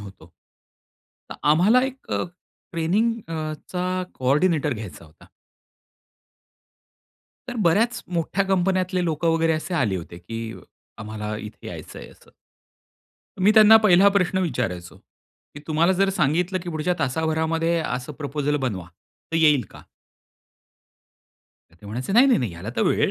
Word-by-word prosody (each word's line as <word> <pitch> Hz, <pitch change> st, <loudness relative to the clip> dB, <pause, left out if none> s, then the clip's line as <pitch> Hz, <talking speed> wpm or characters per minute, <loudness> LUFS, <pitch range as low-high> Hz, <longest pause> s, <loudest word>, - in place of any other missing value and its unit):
होतो. 95 Hz, -4 st, -13 dB, 1.0 s
तर -, -, -6 dB, 0.2 s
आम्हाला 200 Hz, +11 st, +5 dB
एक 265 Hz, 0 st, -5 dB
अ, -, -, 0 dB, 0.5 s
ट्रेनिंग 185 Hz, +8 st, +1 dB, 0.2 s
अ, 155 Hz, -1 st, -3 dB, 0.2 s
चा 180 Hz, 0 st, -3 dB, 0.3 s
कोऑर्डिनेटर 150 Hz, +3 st, +1 dB
घ्यायचा 105 Hz, -6 st, -9 dB
होता. 75 Hz, -1 st, -19 dB, 2.2 s
तर 245 Hz, -, -5 dB
बऱ्याच 230 Hz, +8 st, +2 dB
मोठ्या 180 Hz, +4 st, 0 dB
कंपन्यातले 185 Hz, -1 st, +1 dB
लोक 160 Hz, -1 st, -2 dB
वगैरे 165 Hz, 0 st, +2 dB
असे 155 Hz, +3 st, -3 dB
आले 120 Hz, -, +1 dB
होते 85 Hz, 0 st, -8 dB
की 115 Hz, +6 st, -7 dB, 0.6 s
आम्हाला 105 Hz, -1 st, -5 dB
इथे 105 Hz, 0 st, -10 dB
यायचंय -, -, -9 dB
असं. -, -, -21 dB, 1.1 s
मी 195 Hz, -, +5 dB
त्यांना 220 Hz, 0 st, +9 dB
पहिला 195 Hz, -1 st, +6 dB
प्रश्न 185 Hz, 0 st, +1 dB
विचारायचो 120 Hz, -, -3 dB, 0.6 s
की 150 Hz, -, -9 dB
"तुम्हाला 165 Hz, +3 st, +2 dB
जर 195 Hz, +1 st, +2 dB
सांगितलं 180 Hz, +2 st, 0 dB
की 175 Hz, -, -6 dB
पुढच्या 160 Hz, +3 st, -1 dB
तासाभरामध्ये 160 Hz, +3 st, 0 dB
असं 125 Hz, +3 st, -4 dB
प्रपोजल 145 Hz, 0 st, -2 dB
बनवा, 110 Hz, -, -3 dB, 0.5 s
तर -, -, +1 dB
येईल 150 Hz, -5 st, +4 dB
का?" -, -, -13 dB, 1.9 s
तर 80 Hz, -, -24 dB
ते -, -, -13 dB
म्हणायचे, 125 Hz, -, -4 dB
"नाही, 245 Hz, +5 st, +6 dB
नाही, 265 Hz, -, +4 dB
नाही, 120 Hz, -7 st, -2 dB
ह्याला 85 Hz, +6 st, -7 dB
तर -, -, +2 dB
वेळ -, -, +2 dB
160 Hz, 135 wpm, -23 LUFS, 125-185 Hz, 2.2 s, त्यांना